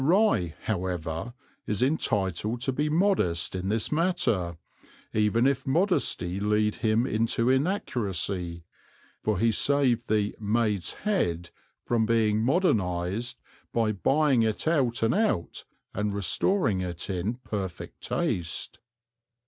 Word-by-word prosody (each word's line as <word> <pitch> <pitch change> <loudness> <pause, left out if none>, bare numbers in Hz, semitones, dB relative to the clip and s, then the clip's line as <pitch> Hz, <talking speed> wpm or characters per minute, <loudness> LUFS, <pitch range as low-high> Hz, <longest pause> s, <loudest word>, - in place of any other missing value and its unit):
Rye, 140 - +3
however, 90 +1 -3 0.3
is 105 +2 0
entitled 110 - 0
to 135 - 0
be 150 +4 -1
modest 155 - +1
in 95 +1 -3
this 110 +1 0
matter, 125 - +1 0.6
even 110 +3 +2
if 135 -1 +1
modesty 135 - +1
lead 105 +1 +1
him 110 +2 +2
into 115 +1 +1
inaccuracy, 100 - -1 0.6
for 110 -2 0
he 115 +4 +3
saved 130 -1 +2
the 105 -1 +1
"Maid's 105 -3 0
Head" 85 - -1 0.3
from 115 -2 +1
being 110 -2 +2
modernized 110 - 0 0.3
by 115 -2 +1
buying 135 - +2
it 110 +6 -1
out 130 -8 +1
and 115 - +3
out 210 - -1 0.3
and 105 0 -2
restoring 105 - +2
it 90 -1 -4
in 95 +4 -2
perfect 100 -7 -6
taste. 85 -2 -2
110 Hz, 115 wpm, -27 LUFS, 95-130 Hz, 0.6 s, Rye